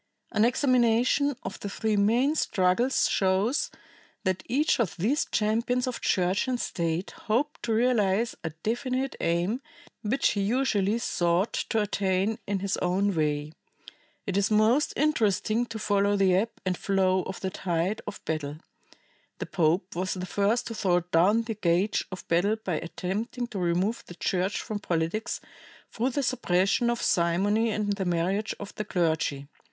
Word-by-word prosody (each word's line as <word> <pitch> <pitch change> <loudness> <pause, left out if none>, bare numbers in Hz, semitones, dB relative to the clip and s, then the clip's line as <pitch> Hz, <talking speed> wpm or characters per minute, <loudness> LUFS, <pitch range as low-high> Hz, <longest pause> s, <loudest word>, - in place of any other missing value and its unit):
An 215 -1 +3
examination 250 +2 +3
of 190 - -6
the 200 - -5
three 215 +2 -1
main 235 +8 +3
struggles 225 -1 +2
shows 195 +8 +1 0.5
that 185 -2 0
each 280 +4 +2
of 220 -7 0
these 235 - +1
champions 230 +4 0
of 255 -2 -4
Church 185 +5 +1
and 250 -1 -1
State 170 -1 -2 0.2
hoped 265 +8 0
to 230 - -1
realize 225 -2 +2
a 160 - -2
definite 255 - -2
aim 175 +9 0 0.4
which 245 +5 +1
he 205 - -1
usually 215 -2 +1
sought 175 -3 0
to 225 - -1
attain 200 0 0
in 200 -2 -1
his 200 0 -1
own 195 +3 +1
way. 150 -1 -1 0.7
It 195 -3 -1
is 200 +1 +2
most 220 +7 +3
interesting 235 -5 +1
to 225 -1 -6
follow 205 -1 +2
the 195 -2 +3
ebb 210 +5 +2 0.2
and 185 -1 +1
flow 190 -1 +1
of 190 - -6
the 190 - -3
tide 180 +4 -1
of 210 - -7
battle. 150 -2 -3 0.8
The - - -4
pope 175 +2 0
was 185 +2 -1
the 185 0 -4
first 205 +5 +1
to 230 - -5
throw 180 -5 +1
down 180 +6 +3
the 225 -1 -3
gage 190 0 +1
of 185 - -8
battle 180 +6 +2
by 190 -7 -3
attempting 205 +8 -4
to 205 - -5
remove 180 +6 0
the 175 - -10
Church 185 +3 -1
from 215 -2 -4
politics 170 +5 -2 0.5
through 240 +3 0
the 280 +2 -1
suppression 235 -2 +1
of 240 0 -1
simony 195 +7 +2
and 210 -1 0
the 195 -1 -3
marriage 180 +5 0
of 205 - -8
the 210 - -4
clergy. 160 -6 0
205 Hz, 160 wpm, -27 LUFS, 180-230 Hz, 0.8 s, An